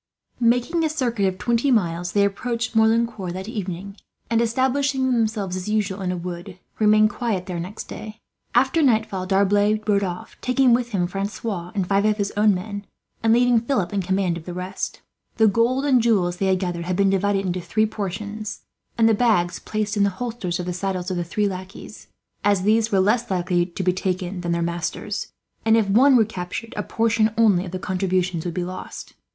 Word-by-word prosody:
Making 245 +8 +2
a 315 - +2
circuit 240 -9 0
of 185 -1 -2
twenty 235 +6 +1
miles, 175 -7 +1
they 200 -1 +4
approached 230 +3 -2
Merlincourt 220 -4 +2
that 190 +2 -6
evening 200 -3 -5 0.3
and, 230 0 +3
establishing 260 +2 +1
themselves 220 -5 0
as 185 +2 -4
usual 205 -2 -1
in 180 -1 -1
a 180 - -3
wood, 175 0 -7 0.2
remained 215 0 +5
quiet 205 -6 -2
there 175 -2 -4
next 185 +5 -6
day. 215 0 -9 0.4
After 265 +6 +3
nightfall 220 -8 +1
D'Arblay 205 +2 +3
rode 200 -1 +3
off, 180 -2 -5
taking 255 -1 +3
with 240 0 +1
him 190 -6 0
Francois 195 -1 -4
and 195 -3 0
five 200 +1 +2
of 215 0 +2
his 200 -1 -2
own 210 -1 +4
men, 200 +2 -6 0.3
and 225 - +3
leaving 245 0 +4
Philip 225 -5 -1
in 200 - +1
command 190 -1 0
of 160 - -10
the 175 - -6
rest. 185 +1 -5 0.4
The 220 - +5
gold 235 +6 +2
and 260 -4 +4
jewels 190 -7 +2
they 195 - 0
had 190 0 +3
gathered 175 -2 -3
had 180 0 -1
been 195 0 +3
divided 195 0 +1
into 180 0 -2
three 215 +6 +1
portions, 210 0 -5 0.4
and 225 -1 +5
the 225 - +5
bags 205 -6 +2
placed 215 0 -2
in 205 - +1
the 200 - +3
holsters 210 -3 -4
of 180 - -3
the 180 - -3
saddles 185 0 -3
of 180 - -2
the 175 - -1
three 205 +5 0
lackeys; 190 +1 -8 0.4
as 200 -2 +2
these 220 +2 +2
were 195 - +3
less 225 +5 +2
likely 175 -1 +1
to 185 +1 -5
be 180 0 +2
taken 185 0 -3
than 170 -1 -2
their 170 0 0
masters 170 0 -3 0.3
and, 225 0 +4
if 220 -3 +2
one 255 +7 +5
were 225 -3 +5
captured, 195 +3 -6
a 210 - -1
portion 225 +1 +1
only 200 -5 +4
of 175 - -7
the 185 - -3
contributions 185 -2 -1
would 175 - -3
be 180 - -1
lost. 185 +1 -7
200 Hz, 200 wpm, -23 LUFS, 185-225 Hz, 0.4 s, remained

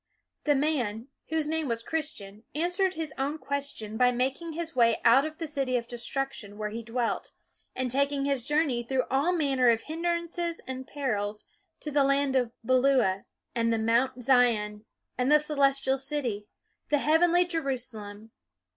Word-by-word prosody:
The 295 -1 +4
man, 265 -5 -1 0.2
whose 320 -1 0
name 320 -1 -1
was 230 -1 -1
Christian, 220 -10 -4
answered 360 +4 +1
his 315 -2 -3
own 280 +3 -1
question 280 -8 -3
by 250 +1 +5
making 265 +7 -2
his 330 -1 -5
way 230 -2 +4
out 250 +5 +6
of 310 0 -6
the 330 - -4
City 270 -4 0
of 235 -1 -4
Destruction 240 -3 -4
where 210 -1 -3
he 230 +2 -5
dwelt, 230 +1 -2 0.5
and 255 -1 -1
taking 280 +1 +1
his 275 -3 +1
journey 295 -3 +1
through 255 +2 0
all 280 +6 +2
manner 275 -7 +2
of 225 -1 +2
hindrances 340 +1 -2
and 260 0 -6
perils 215 -7 -3 0.4
to 300 - -5
the 285 -1 +4
land 275 0 +2
of 245 -3 +2
Beulah, 255 -6 +3 0.3
and 230 -1 +1
the 225 - +2
Mount 245 +3 +1
Zion, 225 -5 +2 0.3
and 250 +3 +2
the 300 - +8
Celestial 275 -3 +1
City, 255 -7 -3 0.4
the 295 - +4
heavenly 340 +4 +4
Jerusalem. 240 - -4
270 Hz, 160 wpm, -28 LUFS, 235-300 Hz, 0.5 s, the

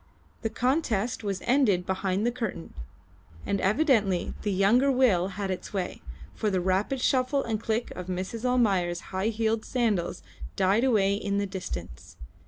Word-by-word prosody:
The 225 - -1
contest 235 -3 0
was 195 -3 -3
ended 235 -9 +3
behind 190 +2 -1
the 240 - +2
curtain, 225 -8 -5 0.7
and 200 - -1
evidently 210 - +2
the 205 - -1
younger 215 +9 +4
will 230 -9 +3
had 195 -2 -2
its 185 - -6
way, 185 -3 -3 0.3
for 215 - -1
the 190 -2 +1
rapid 190 +8 0
shuffle 260 +2 +1
and 220 -2 -2
click 225 +1 -1
of 180 -1 -7
Mrs. 185 +5 -4
Almayer's 195 -9 +1
high 190 +3 0
heeled 225 0 0
sandals 220 -9 -1 0.3
died 195 +5 +2
away 210 -7 +3
in 200 0 -1
the 200 - +1
distance. 180 - -7
205 Hz, 155 wpm, -27 LUFS, 190-240 Hz, 0.7 s, younger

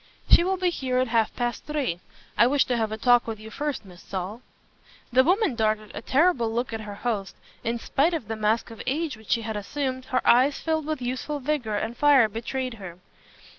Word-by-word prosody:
"She - - +8
will 380 +1 0
be 365 -1 +1
here 260 -6 -2
at 255 -1 +1
half 225 -2 +2
past 240 -2 -2
three. 285 - -2 0.4
I 235 - +5
wish 280 +2 +3
to 250 - 0
have 220 -2 -1
a 220 - -3
talk 245 +1 +4
with 220 -2 -4
you 220 +1 -10
first, 290 -3 -3
Miss 180 -2 -14
Saul." 195 +5 -5 0.7
The 260 +1 +6
woman 375 - +2
darted 215 -2 0
a 210 - -6
terrible 265 -3 +2
look 235 +1 -2
at 225 - -3
her 205 -1 -7
host. 205 -6 -2 0.3
In 230 +1 -1
spite 300 +8 +1
of 255 -10 -5
the 225 - -3
mask 220 +2 0
of 225 - -9
age 295 +1 -1
which 220 -1 -17
she 230 - +2
had 220 0 -4
assumed, 260 +4 -3
her 255 0 -1
eyes 260 +4 +5
filled 315 -2 -1
with 305 -5 -3
youthful 260 +4 -3
vigor 260 -6 -1
and 225 +3 -2
fire 280 -5 +5
betrayed 245 +4 -4
her. 175 -2 -8
245 Hz, 215 wpm, -25 LUFS, 220-285 Hz, 0.7 s, She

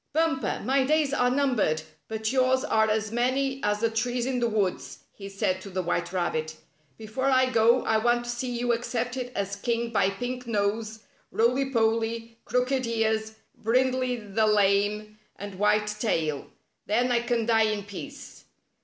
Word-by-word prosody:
"Bumper, 310 -7 0
my 270 +1 +3
days 295 0 +2
are 250 -3 +3
numbered, 250 - +1 0.2
but 220 0 -2
yours 260 0 +2
are 220 -6 +2
as 215 0 0
many 265 +3 0
as 210 0 0
the 230 - +2
trees 240 +2 -1
in 260 -1 -1
the 235 -1 +1
woods," 205 -4 -2
he 195 -1 -9
said 195 -2 -1
to 195 - -9
the 185 -1 -2
White 175 - -1
Rabbit. 160 -4 -2 0.2
" 145 -4 -39
Before 220 +5 -3
I 260 -1 +3
go 235 +1 +4
I 220 - +3
want 240 +1 +2
to 240 - -4
see 240 +1 -3
you 240 0 0
accepted 245 +2 -3
as 200 0 -2
king 235 +2 -2
by 195 -4 +2
Pink 245 +5 -5
Nose, 220 +1 -1 0.3
Roily 250 +4 +2
Polly, 230 0 0
Crooked 250 0 0
Ears, 220 -1 0 0.2
Brindley 255 +2 +1
the 215 -1 0
Lame 210 +1 +1 0.2
and 200 -2 -8
White 210 0 +2
Tail. 160 - -1 0.4
Then 245 +4 +2
I 240 - +3
can 235 -1 -1
die 225 -1 +4
in 210 -1 -2
peace." 200 -1 -10
230 Hz, 170 wpm, -27 LUFS, 210-250 Hz, 0.4 s, go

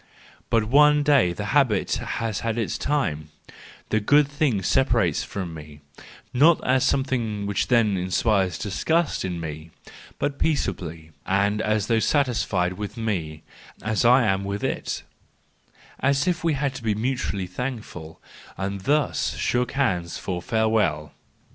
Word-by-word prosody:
But 115 -1 +3
one 150 +4 +5
day 140 -11 +4
the 100 +4 -5
habit 130 -9 +2
has 115 -3 -3
had 115 0 -2
its 115 -3 -1
time: 80 - -1 0.6
the 110 - +2
good 145 +7 +4
thing 140 -8 0
separates 115 - +2
from 90 -4 -5
me, 75 -1 -11 0.5
not 155 +6 +5
as 130 0 +3
something 120 -7 0
which 100 -2 -1
then 110 -5 +3
inspires 95 +1 +1
disgust 160 - 0
in 90 -2 -3
me—but 80 - -7
peaceably 85 - -2 0.2
and 100 +2 +1
as 110 -2 0
though 115 - +2
satis¬ 130 +1 +1
fied 90 -2 0
with 105 +2 -6
me, 85 -9 -3 0.4
as 110 +2 0
I 125 +1 +5
am 95 -2 +1
with 100 +1 -4
it; - - -3 1.0
as 140 +4 +1
if 175 -2 0
we 165 -2 +2
had 140 -1 -1
to 135 - -8
be 110 -2 0
mutually 110 -4 -2
thankful, 105 -8 -6 0.4
and 100 0 -3
thus 145 +5 0
shook 125 0 -1
hands 90 - 0
for 90 -1 -4
farewell. 105 -9 0
110 Hz, 140 wpm, -24 LUFS, 95-135 Hz, 1.0 s, one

